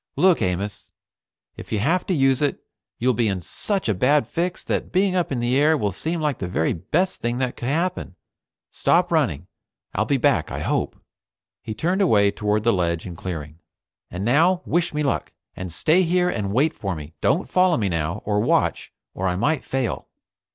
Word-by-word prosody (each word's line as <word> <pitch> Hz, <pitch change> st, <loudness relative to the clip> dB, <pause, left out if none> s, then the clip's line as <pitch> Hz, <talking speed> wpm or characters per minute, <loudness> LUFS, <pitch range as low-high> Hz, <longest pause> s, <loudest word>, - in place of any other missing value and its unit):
"Look, 185 Hz, -1 st, +4 dB
Amos. 95 Hz, +3 st, -2 dB, 0.7 s
If -, -, -10 dB
you 110 Hz, -, +1 dB
have 165 Hz, -, +1 dB
to 190 Hz, -, +1 dB
use 135 Hz, -2 st, +3 dB
it, 145 Hz, -2 st, -1 dB, 0.3 s
you'll 125 Hz, +2 st, +2 dB
be 115 Hz, 0 st, +1 dB
in 95 Hz, -2 st, -1 dB
such 195 Hz, -, -3 dB
a 110 Hz, -, +2 dB
bad 140 Hz, +10 st, +2 dB
fix 175 Hz, +2 st, -2 dB
that -, -, -2 dB
being 190 Hz, 0 st, +2 dB
up 180 Hz, -4 st, 0 dB
in 130 Hz, -, -1 dB
the 120 Hz, +2 st, +1 dB
air 150 Hz, +3 st, +4 dB
will 105 Hz, -6 st, -1 dB
seem 160 Hz, -, -2 dB
like 150 Hz, -4 st, -1 dB
the 90 Hz, -, -3 dB
very 80 Hz, -2 st, 0 dB
best 180 Hz, -, -1 dB
thing 120 Hz, +1 st, -1 dB
that 125 Hz, -1 st, -1 dB
could 120 Hz, -, -4 dB
happen. 165 Hz, -, -1 dB, 0.6 s
Stop -, -, +2 dB
running. 75 Hz, +5 st, +1 dB, 0.5 s
I'll -, -, 0 dB
be -, -, +1 dB
back -, -, +2 dB
I -, -, -4 dB
hope." -, -, -1 dB, 0.6 s
He 110 Hz, -, -6 dB
turned 180 Hz, -, 0 dB
away 105 Hz, -, +4 dB
toward 105 Hz, +1 st, -1 dB
the 115 Hz, -, +3 dB
ledge 85 Hz, -3 st, -1 dB
and 90 Hz, -3 st, -7 dB
clearing. 80 Hz, -3 st, -6 dB, 0.5 s
"And 90 Hz, +3 st, -4 dB
now, 170 Hz, +9 st, +3 dB
wish 170 Hz, 0 st, 0 dB
me 150 Hz, 0 st, -1 dB
luck, 140 Hz, -, -1 dB, 0.2 s
and 90 Hz, -2 st, -6 dB
stay 160 Hz, -, +3 dB
here 180 Hz, 0 st, +2 dB
and 100 Hz, -3 st, -3 dB
wait 140 Hz, +9 st, +2 dB
for 95 Hz, -3 st, -4 dB
me. 75 Hz, 0 st, -9 dB
Don't 180 Hz, -, +1 dB
follow 185 Hz, -2 st, +3 dB
me 105 Hz, -, 0 dB
now, 85 Hz, +2 st, -2 dB
or 105 Hz, -1 st, +1 dB
watch, 110 Hz, -, +1 dB, 0.2 s
or 95 Hz, -, -2 dB
I 90 Hz, -, 0 dB
might 135 Hz, -, 0 dB
fail." 130 Hz, -4 st, -2 dB
120 Hz, 200 wpm, -23 LUFS, -, 0.7 s, Look